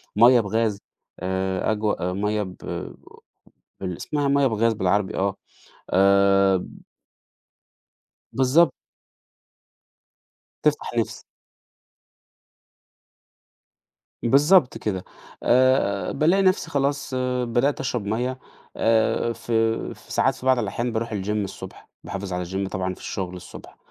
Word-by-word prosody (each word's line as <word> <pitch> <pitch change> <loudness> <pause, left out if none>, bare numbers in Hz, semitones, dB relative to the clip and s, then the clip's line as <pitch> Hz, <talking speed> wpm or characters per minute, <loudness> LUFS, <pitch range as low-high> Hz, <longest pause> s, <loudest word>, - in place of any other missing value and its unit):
مَيّة 120 +3 +7
بغاز 110 -1 -1 0.4
آآ 95 +1 -1
أجوا 105 -4 -1
آآ - - -3
مَيّة 105 +2 -1
ب 95 -1 -8 1.3
بال 90 -2 -4
إسمها 145 - -2
مَيّة 140 0 +3
بغاز 115 -1 +2
بالعربي 100 0 0
آه، 95 0 0 0.6
آمم 100 0 +3 1.5
بالضبط. 135 +6 +4 1.9
تِفتَح - - +1
نِفسي. - - -2 3.0
بالضبط 140 +4 +4
كده، 95 -4 -3 0.4
آآ 125 -5 +3
بالاقي 175 +7 +2
نفسي 185 -2 +2
خلاص 140 -1 -1 0.3
بدأت 120 +4 +1
أشرب 125 -5 -2
مَيّة 125 +5 -2 0.4
آآ 115 +1 +2
في 115 -1 -1
في - - -17
ساعات - - +2
في - - -11
بعض 130 -1 +4
الأحيان 120 +3 -2
باروح 115 +1 -2
الgym 100 0 -3
الصبح، 105 -3 -5
باحافظ 100 -1 -5
على 90 0 -2
الgym 95 +2 -3
طبعًا 95 -1 -2
في - - -14
الشغل 90 -2 -5
الصبح، 90 - -12
110 Hz, 110 wpm, -24 LUFS, 95-130 Hz, 3.0 s, مَيّة